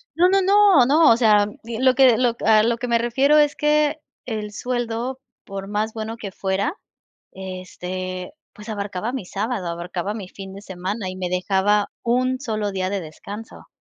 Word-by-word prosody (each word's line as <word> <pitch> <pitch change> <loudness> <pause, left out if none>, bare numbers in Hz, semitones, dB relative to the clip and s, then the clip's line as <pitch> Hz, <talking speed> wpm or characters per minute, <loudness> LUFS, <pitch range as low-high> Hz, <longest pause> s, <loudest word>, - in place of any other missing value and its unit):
No, 355 +2 +5
no, 390 +1 +4
no, 395 -8 +6
no, 305 +5 +5
o 230 - +5
sea, 210 -4 +4 0.2
di 230 0 -5
lo 260 0 +4
que 255 -3 +6
lo 245 -2 +2
a 215 0 +6
lo 230 +1 +1
que 245 +1 -4
me 235 -1 +2
refiero 265 +6 +3
es 295 -1 +3
que, 300 0 +2 0.3
el 215 -3 -4
sueldo, 245 +2 -3 0.2
por 195 -1 -7
más 215 +2 -2
bueno 225 +1 -5
que 200 -3 -7
fuera, 195 - -1 0.6
este, 185 0 -6 0.2
pues, 210 +2 -13
abarcaba 205 +1 -4
mi 265 - -3
sábado, 200 -1 -3
abarcaba 175 +3 -4
mi 210 -4 -7
fin 190 0 -10
de 200 - -10
semana 190 +1 -4
y 185 - -6
me 185 -1 -3
dejaba 195 +3 +1
1 255 +2 +1
solo 215 -5 -2
día 185 -1 -2
de 200 0 -1
descanso. 200 +7 -10
215 Hz, 185 wpm, -22 LUFS, 190-250 Hz, 0.6 s, no